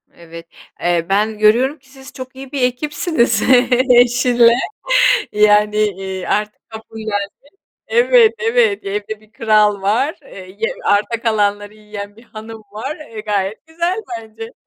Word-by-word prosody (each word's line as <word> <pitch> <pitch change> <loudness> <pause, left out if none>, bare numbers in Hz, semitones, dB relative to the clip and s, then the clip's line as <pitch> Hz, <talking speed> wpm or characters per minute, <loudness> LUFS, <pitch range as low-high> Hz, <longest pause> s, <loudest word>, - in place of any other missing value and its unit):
Evet. 165 0 -12 0.3
Eee, 175 -1 0
ben 210 +2 0
görüyorum 245 +8 +2
ki 265 0 -26
siz 265 0 -14
çok 255 -1 -9
iyi 265 0 -10
bir 280 - -3
ekipsiniz 250 - 0 0.5
eşinle, 245 -1 +4 0.8
yani, 210 0 +3 0.2
ııı, 190 -1 -6
artık 210 0 -3
kabullendin. 220 -2 -5 0.6
Evet, 475 -1 +4
evet, 460 -3 +1
evde 210 +2 -5
bir 215 0 -25
kral 210 -3 +2
var, 255 - 0
eee, 185 -7 -13
ye 225 - -1
arta 210 +3 +1
kalanları 205 -2 -1
yiyen 210 -1 -9
bir 225 - -17
hanım 220 -1 -11
var, 265 +9 -5
e, 230 -8 -10
gayet 210 +3 -3
güzel 340 +5 -2 0.2
bence. 225 +1 -11
220 Hz, 135 wpm, -17 LUFS, 210-260 Hz, 0.8 s, eşinle